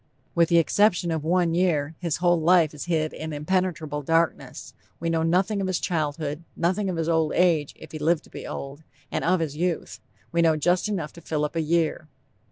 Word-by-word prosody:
With 170 -1 +3
the 170 - +4
exception 175 +1 +3
of 160 -2 -2
one 170 0 +2
year, 165 -4 +1
his 170 -4 -1
whole 175 -1 +2
life 165 -2 +4
is 150 - -6
hid 160 -3 0
in 160 0 -6
impenetrable 155 -1 -1
darkness. 165 +2 -1 0.3
We 165 0 -1
know 165 -1 +1
nothing 185 +5 +1
of 190 - -1
his 185 -2 0
childhood, 155 -2 -2
nothing 190 +4 0
of 180 - -3
his 165 -1 -1
old 160 -2 +1
age, 165 -5 +2
if - - -13
he 155 - -6
lived 160 +1 +1
to - - -20
be - - -8
old, 140 +2 -7 0.3
and - - -2
of 180 0 +2
his 150 -3 -3
youth, 170 +1 -2 0.3
we 170 - +2
know 160 -2 +3
just 175 +6 +1
enough 170 -8 -3
to 170 - -12
fill 150 -2 -1
up 150 - -6
a 165 - +1
year. 160 -1 0
165 Hz, 210 wpm, -25 LUFS, 155-175 Hz, 0.3 s, the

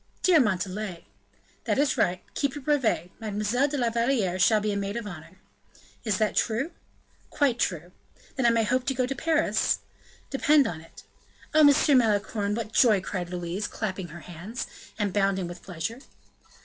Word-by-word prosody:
"Dear 360 -4 +6
Montalais!" 195 - -1 0.6
"That - - +1
is 285 0 +2
right. 180 +1 0
Keep 280 -1 -1
your 290 - -7
brevet; 255 - +1
Mademoiselle 215 +5 0
de 290 0 -3
la 240 -3 +1
Valliere 230 -6 +1
shall 215 +3 +5
be 210 0 -1
a - - -2
maid 200 +2 -2
of 235 - -4
honor." 175 -2 -10 0.7
"Is 215 -5 0
that 215 -1 0
true?" 240 +9 0 0.6
"Quite 270 -5 +1
true." 175 -1 -1 0.4
"I 265 - -1
may 230 -1 +3
then - - 0
hope 255 +3 0
to 270 - 0
go 255 0 +1
to 265 - -2
Paris?" 320 +3 +1 0.5
"Depend 285 +1 +4
on 160 -2 -4
it." 165 - -15 0.5
"Oh! 310 0 +6
Monsieur 290 +1 +5
Malicorne, 210 -3 +2
what 225 -1 -5
joy!" 220 -6 +5
cried 180 -2 -4
Louise, 180 +3 -3
clapping 190 -4 -4
her 170 +1 -10
hands, 185 +7 -6 0.3
and 205 -3 -1
bounding 195 -3 +1
with 175 0 -9
pleasure. 180 +6 -5
215 Hz, 175 wpm, -27 LUFS, 185-255 Hz, 0.7 s, Dear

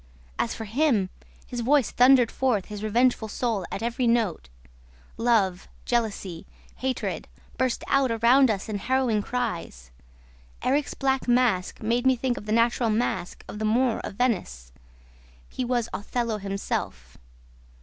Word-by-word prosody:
As - - 0
for 225 - -6
him, 225 -4 +1 0.3
his 245 - -6
voice 265 +1 +2
thundered 250 -1 +5
forth 245 -8 0
his 210 -1 -7
revengeful 235 +1 +2
soul 220 -4 -2
at 210 - -4
every 240 +1 0
note. 220 - 0 0.7
Love, 210 -6 +1 0.2
jealousy, 205 -7 -2 0.3
hatred, 260 0 -3 0.3
burst 255 -2 -1
out 275 -2 +2
around 235 +4 +4
us 200 -3 -2
in 210 -2 -3
harrowing 250 -2 +1
cries. 175 - -4 0.7
Erik's 280 +3 0
black 265 -1 0
mask 240 -7 +1
made 240 +4 +1
me 260 - +5
think 250 0 -1
of 210 - -9
the - - -2
natural 230 +1 +2
mask 215 -5 -2
of 210 - -7
the 215 - -1
Moor 255 -3 +1
of - - -6
Venice. 175 - -1 0.8
He - - -4
was 240 -2 0
Othello 230 +1 -2
himself. 195 - -4
235 Hz, 140 wpm, -26 LUFS, 205-250 Hz, 0.8 s, thundered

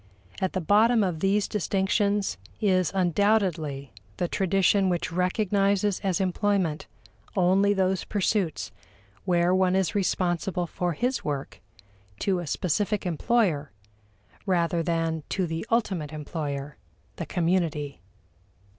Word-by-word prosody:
At 190 - 0
the 185 - -1
bottom 215 +5 +4
of 180 -4 -1
these 195 +3 +2
distinctions 200 +1 0 0.2
is 185 -5 +2
undoubtedly 175 - +1 0.2
the 175 - 0
tradition 195 +1 +2
which 175 -2 -1
recognizes 195 +2 +1
as 195 -2 -1
employment 190 -4 0 0.5
only 190 +2 +3
those 190 -1 +1
pursuits 200 -4 -1 0.5
where 175 -1 +3
one 185 0 +3
is 190 -2 +1
responsible 180 -2 0
for 175 +1 -2
his 250 - -1
work 145 -2 -4 0.6
to 190 - 0
a 175 - -6
specific 205 +6 -1
employer, 175 - +1 0.8
rather 170 -2 +1
than 165 -1 -1
to 190 - 0
the 165 +5 -4
ultimate 190 -10 0
employer, 145 -2 -5 0.4
the - - -5
community. 165 - -1
185 Hz, 115 wpm, -26 LUFS, 165-200 Hz, 0.8 s, bottom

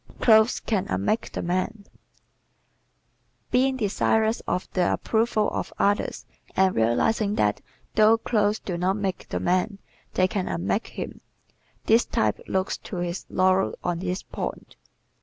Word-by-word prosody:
Clothes 220 0 +5
Can 205 -5 -1
Unmake 95 - -1
the - - -4
Man 185 +4 -2
¶ - - -29 1.6
Being 260 +1 +3
desirous 220 0 +1
of 180 - -1
the 180 -2 +2
approval 220 -1 +1
of - - -3
others 205 +1 0 0.3
and 190 -1 +3
realizing 200 - +2
that 105 - +1 0.3
though 220 +1 +5
clothes 215 -2 +1
do 175 -5 -5
not 185 +2 +1
make 195 -3 -3
the - - -2
man 185 +3 0 0.4
they 185 - +4
can 185 -1 -2
unmake 90 +3 -1
him, - - -7 0.6
this 225 +2 +5
type 110 -1 0
looks 190 0 -1
to - - -8
his 175 0 -3
laurels 185 +1 +2
on 175 -1 -1
this 185 +1 -3
point. - - -6
190 Hz, 140 wpm, -25 LUFS, 180-220 Hz, 1.6 s, Clothes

